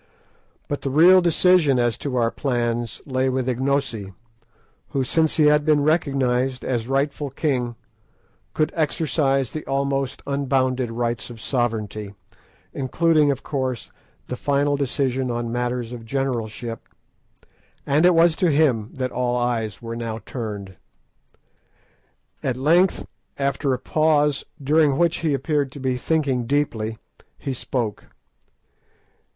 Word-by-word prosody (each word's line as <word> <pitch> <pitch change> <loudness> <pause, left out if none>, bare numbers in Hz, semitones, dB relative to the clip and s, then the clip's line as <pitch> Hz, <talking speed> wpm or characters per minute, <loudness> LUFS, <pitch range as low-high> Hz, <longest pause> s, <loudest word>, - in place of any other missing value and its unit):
But 145 - -3
the 135 - -2
real 175 +7 +7
decision 170 -4 +4
as 120 -2 +1
to 140 -3 -3
our 115 -2 +2
plans 120 -3 -2
lay 130 -1 0
with 130 -1 -1
Ignosi, 130 -5 -1 0.8
who, 135 -2 0
since 160 +5 +1
he 155 - +5
had 150 0 +5
been 150 -2 +3
recognised 135 -5 +1
as 120 -3 -1
rightful 140 +2 -1
king, 125 -4 -1 0.8
could 155 - +1
exercise 140 -4 0
the 155 - -5
almost 135 -1 -1
unbounded 130 -3 0
rights 120 +1 -2
of 120 -2 -10
sovereignty, 110 -4 -2 0.6
including, 150 +3 +2
of 140 -2 -1
course, 130 -4 -3 0.3
the 125 - -4
final 145 +2 +1
decision 135 -2 -1
on 120 -1 -2
matters 120 -1 -2
of 120 -2 -7
generalship, 115 -2 -3 1.0
and 145 +3 +2
it 180 -1 +6
was 165 0 +5
to 180 -4 +2
him 135 -8 +2
that 130 -1 -2
all 125 0 0
eyes 120 -3 -2
were 115 0 -5
now 115 -1 -4
turned. 100 -6 -6 1.6
At 130 -2 -1
length, 170 +7 +3 0.3
after 140 0 0
a 130 - +1
pause, 150 +1 +1
during 145 0 +3
which 170 0 +2
he 155 -4 0
appeared 145 -2 -1
to 145 - -9
be 130 -1 0
thinking 130 -3 0
deeply, 115 -6 -1 0.4
he 135 - -4
spoke. 120 -4 -3
135 Hz, 130 wpm, -23 LUFS, 120-145 Hz, 1.6 s, real